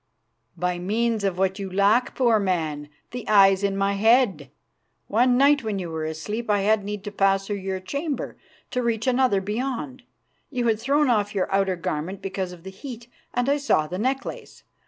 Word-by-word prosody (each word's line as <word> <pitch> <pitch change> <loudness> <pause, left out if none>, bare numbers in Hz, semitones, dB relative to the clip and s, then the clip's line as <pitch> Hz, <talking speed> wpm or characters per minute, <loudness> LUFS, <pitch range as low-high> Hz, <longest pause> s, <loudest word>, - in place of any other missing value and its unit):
"By 180 0 -1
means 220 +4 0
of 195 -3 0
what 190 +1 0
you 195 -1 -5
lack, 200 +6 +2
poor 235 -4 +3
man, 160 -7 -2 0.2
the 245 0 -6
eyes 195 -2 +6
in 195 -1 0
my 195 0 +1
head. 200 - +3 0.6
One 245 +3 +3
night 280 0 +4
when 215 -2 -2
you 175 -3 -4
were 160 -1 -3
asleep 210 +9 -4
I 205 -1 +3
had 210 +1 +2
need 205 0 -5
to 205 - -5
pass 195 -1 +2
through 205 0 -3
your 190 -1 -3
chamber 280 - -4 0.4
to 250 - 0
reach 230 -2 -1
another 255 -6 +2
beyond. 210 - -3 0.5
You 250 -4 -2
had 225 -2 +2
thrown 285 +5 +2
off 205 -2 0
your 195 0 -1
outer 195 -1 +2
garment 170 +3 -4
because 190 -1 -4
of 175 -2 -12
the 190 - -8
heat, 235 +3 -9 0.3
and 245 +1 +1
I 285 +1 +3
saw 280 - +2
the 180 +4 -5
necklace. 265 +4 -3
200 Hz, 190 wpm, -24 LUFS, 190-240 Hz, 0.6 s, eyes